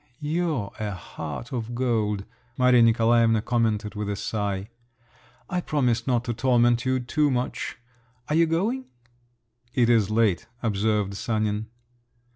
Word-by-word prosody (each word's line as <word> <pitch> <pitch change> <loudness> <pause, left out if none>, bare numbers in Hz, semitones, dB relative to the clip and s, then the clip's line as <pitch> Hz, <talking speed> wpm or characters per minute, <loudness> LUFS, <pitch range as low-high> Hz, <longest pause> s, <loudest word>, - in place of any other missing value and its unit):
you're 150 - -1
a 105 -1 -2
heart 95 +5 -7
of 120 -1 -3
gold!" 110 -5 0 0.3
Maria 125 -1 +5
Nikolaevna 115 0 +4
commented 110 -4 0
with 105 -1 -4
a 100 - -1
sigh. 100 -1 -3 0.8
"I 180 -1 -1
promise 125 -7 0
not 120 -2 +2
to 120 - -2
torment 120 0 +3
you 130 0 +1
too 145 +4 +1
much. 125 -1 -2 0.5
Are - - -1
you 165 +1 +4
going?" 215 +11 0 0.9
"It 120 -1 +4
is 110 -5 +3
late," 110 -2 +1 0.2
observed 105 -2 0
Sanin. 110 0 -1
115 Hz, 130 wpm, -25 LUFS, 105-130 Hz, 0.9 s, Maria